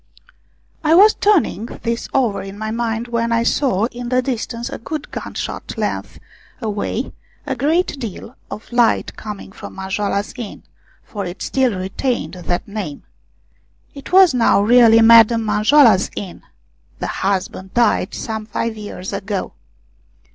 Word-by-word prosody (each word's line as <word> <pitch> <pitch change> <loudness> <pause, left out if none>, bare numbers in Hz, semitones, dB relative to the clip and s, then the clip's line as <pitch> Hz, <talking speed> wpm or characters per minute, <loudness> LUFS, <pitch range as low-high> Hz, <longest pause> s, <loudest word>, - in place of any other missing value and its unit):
I 315 +1 +4
was 415 +4 +7
turning 345 - +1 0.2
this 230 0 -2
over 220 -7 +1
in 195 +1 -8
my 220 +1 -4
mind 230 0 -2
when 235 0 -1
I 230 0 +2
saw 235 -5 +1
in 245 0 -6
the 255 0 +2
distance, 235 -2 -3
a - - -6
good 300 +5 -6
gun - - -7
shot - - -5
length - - -3 0.4
away, 220 +2 -3 0.3
a 265 - -2
great 300 +4 0
deal 230 +1 -7
of 215 - -9
light 240 -1 +2
coming 210 -3 -8
from - - -10
Manjoala's 200 +1 -2
Inn, 225 -5 -7 0.4
for 205 -2 -6
it 175 +1 -6
still 255 -7 +1
retained 195 +7 -2
that 180 +3 -3
name. 200 -8 -6 0.9
It 280 +3 -10
was 370 -4 +7
now 230 -4 +3
really 230 0 +6
Madame 230 0 +7
Manjoala's 215 0 +4
inn 190 -3 -7 0.6
the - - -4 0.2
husband 190 -1 -2
died 235 -5 +2
some 220 -1 -5
five 225 +1 -2
years 205 -2 -7
ago. 200 0 -3
225 Hz, 145 wpm, -19 LUFS, 200-245 Hz, 0.9 s, was